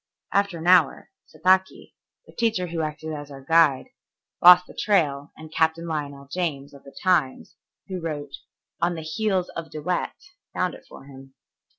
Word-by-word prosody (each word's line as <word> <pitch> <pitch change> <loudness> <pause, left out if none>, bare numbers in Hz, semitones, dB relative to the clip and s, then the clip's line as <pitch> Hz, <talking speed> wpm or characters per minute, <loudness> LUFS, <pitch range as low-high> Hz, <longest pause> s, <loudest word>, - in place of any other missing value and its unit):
After 200 -3 +1
an 165 - -8
hour, 180 -5 +3 0.2
Sataki, 185 +4 +1 0.3
the - - -17
teacher 225 -6 0
who 170 -1 -4
acted 155 0 -5
as 145 -1 -7
our 135 -1 -12
guide, 160 -5 +3 0.5
lost 180 0 +9
the - - -14
trail 150 -8 0
and 155 0 -12
Captain 160 +1 +1
Lionel 145 -4 -5
James, 150 -7 -3
of 140 - -15
the 140 - -15
Times, 170 -9 0 0.3
who 185 -2 -5
wrote 145 -3 -5 0.4
"On 175 0 +1
the 160 - -6
Heels 185 +3 -1
of 165 -1 -7
De 155 - -7
Wet," 175 +4 -2 0.4
found - - 0
it - - -14
for - - -12
him. 135 -1 -14
160 Hz, 170 wpm, -24 LUFS, 145-180 Hz, 0.5 s, lost